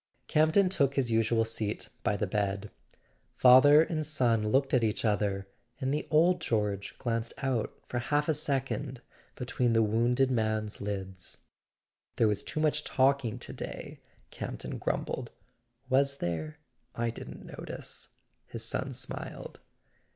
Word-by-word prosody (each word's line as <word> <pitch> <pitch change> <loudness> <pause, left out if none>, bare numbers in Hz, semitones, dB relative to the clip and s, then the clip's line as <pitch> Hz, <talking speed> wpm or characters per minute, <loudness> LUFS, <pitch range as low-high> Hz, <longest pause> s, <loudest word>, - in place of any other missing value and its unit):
Camp 155 +1 +3
ton 200 0 +5
took 140 -7 +2
his 130 -4 +1
usual 115 0 +3
seat 110 -2 -2
by 105 - 0
the 105 - 0
bed. 100 0 -2 0.7
Father 145 +5 +8
and 160 -1 -2
son 120 -8 +1
looked 135 +4 +2
at 125 -3 +4
each 110 +1 0
other, 100 -2 0 0.3
and 135 0 0
the 150 - -2
old 170 +3 +4
George 105 -6 -1
glanced 115 -1 -2
out 130 -5 -2
for 120 - -2
half 145 +4 0
a 160 - +3
second 135 -3 -2 0.3
between 125 -1 0
the 115 0 +4
wounded 120 +5 +2
man's 110 -3 -1
lids. 95 -3 -5 0.7
"There 115 - +3
was 105 -1 0
too - - -4
much 150 -1 +1
talking 135 -4 +2
to - - -6
day," - - -7 0.3
Campton - - -5
grumbled. - - -2 0.6
"Was 140 +1 +2
there? 80 - -3 0.4
I 115 0 0
didn't - - -9
notice," - - -6 0.4
his 115 -1 -4
son 130 +3 -2
smiled. 130 0 -4
120 Hz, 145 wpm, -30 LUFS, 105-140 Hz, 0.7 s, Father